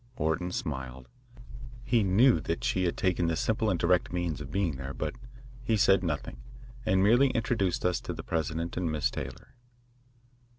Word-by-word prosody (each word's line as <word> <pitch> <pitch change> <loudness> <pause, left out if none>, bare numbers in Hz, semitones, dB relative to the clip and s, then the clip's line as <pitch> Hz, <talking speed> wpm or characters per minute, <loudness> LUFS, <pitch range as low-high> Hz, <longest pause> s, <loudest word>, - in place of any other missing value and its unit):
Orton 85 0 -1
smiled. 65 -6 -5 0.8
He 120 -1 +2
knew 105 +6 +4
that 85 - -3
she 95 0 +1
had 85 - -1
taken 90 -2 +1
this 85 -1 0
simple 110 0 +1
and 90 -4 0
direct 90 0 +2
means 85 -5 -2
of 70 - -7
being 85 -4 -1
there, 65 0 -6
but 75 +4 -3 0.5
he 115 -3 +1
said 95 -2 +4
nothing, 70 -7 -3 0.5
and 95 -2 +3
merely 120 +7 +5
introduced 110 -8 0
us 90 -1 +1
to - - -5
the - - -7
president 85 +1 -2
and 85 -3 -1
Miss 75 -4 0
Taylor. - - -7
90 Hz, 170 wpm, -29 LUFS, 80-100 Hz, 0.8 s, merely